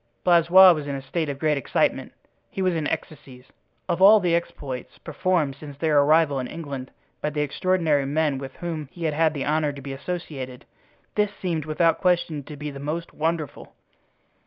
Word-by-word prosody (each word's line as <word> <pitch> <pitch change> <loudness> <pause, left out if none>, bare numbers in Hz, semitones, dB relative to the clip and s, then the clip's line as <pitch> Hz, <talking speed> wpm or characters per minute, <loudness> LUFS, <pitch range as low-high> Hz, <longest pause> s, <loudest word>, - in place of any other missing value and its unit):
Blaisois 180 +2 +7
was 150 -3 -5
in 140 - -3
a 135 - -5
state 155 +3 -2
of 140 - -4
great 150 -1 +1
excitement; 130 - 0 0.4
he - - -8
was 185 -1 +2
in 160 -3 -1
ecstasies. 130 -5 -6 0.4
Of 175 0 -1
all 210 +3 +8
the 175 -3 0
exploits 140 -6 -4
performed 175 -7 -1
since 145 -1 -10
their 150 -1 +3
arrival 150 -1 +3
in 125 - -3
England 140 -5 -7 0.3
by 150 - 0
the 150 0 -2
extraordinary 155 -1 +1
men 145 -1 0
with 135 -1 -8
whom 160 -5 -5
he 170 - -9
had 160 0 +1
the 135 - -2
honor 150 0 +1
to 140 - -10
be 135 0 -6
associated, 135 -4 -6 0.5
this 210 -1 +1
seemed 165 -5 -2
without 165 +2 +1
question 170 -4 +1
to 150 - -9
be 150 0 -5
the 140 - -9
most 155 +4 -4
wonderful. 160 -1 -3
155 Hz, 180 wpm, -24 LUFS, 140-170 Hz, 0.5 s, all